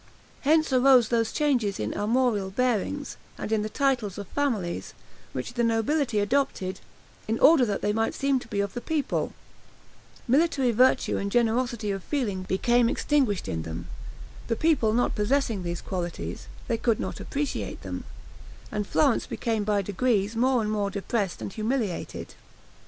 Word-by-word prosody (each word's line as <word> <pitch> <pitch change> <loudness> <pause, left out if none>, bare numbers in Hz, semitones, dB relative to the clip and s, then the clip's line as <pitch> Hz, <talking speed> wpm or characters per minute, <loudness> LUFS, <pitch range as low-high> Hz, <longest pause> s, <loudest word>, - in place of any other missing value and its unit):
Hence 310 0 +3
arose 255 -3 +6
those 230 -2 +1
changes 250 -10 +1
in 105 0 -2
armorial 215 -2 +1
bearings, 250 +6 -1 0.2
and - - -5
in 220 -1 +2
the 215 - -3
titles 245 -7 0
of 200 -2 -6
families, 225 -12 -2 0.4
which - - -5
the 240 -1 0
nobility 230 +2 +1
adopted, 205 -4 0 0.5
in 225 +1 0
order 290 -2 +6
that 200 -2 -2
they 210 - +1
might 225 +1 0
seem 275 -1 +1
to - - -12
be 205 -3 -1
of 200 -1 -3
the 245 - -4
people; 310 0 -1 1.0
military 275 -1 +3
virtue 250 +3 +3
and 200 0 -2
generosity 235 -1 +1
of 195 -2 -4
feeling 225 -10 -2
became 235 +6 +2
extinguished 260 -11 +1
in 80 - -2
them; 85 +2 -6 0.6
the 230 - 0
people 280 -7 +2
not 240 +3 +1
possessing 225 -1 0
these 175 -1 -4
qualities, 175 -3 -5 0.2
they 230 - 0
could 230 -2 +1
not - - -4
appreciate 285 0 -3
them, - - -5 0.7
and 210 -1 -2
Florence 280 -6 +2
became 225 -3 -1
by 205 -1 +1
degrees 205 +1 0
more 250 0 +2
and 210 - -1
more 205 -2 0
depressed 200 -1 -2
and 195 - -5
humiliated. 220 -4 -3
225 Hz, 155 wpm, -26 LUFS, 205-260 Hz, 1.0 s, arose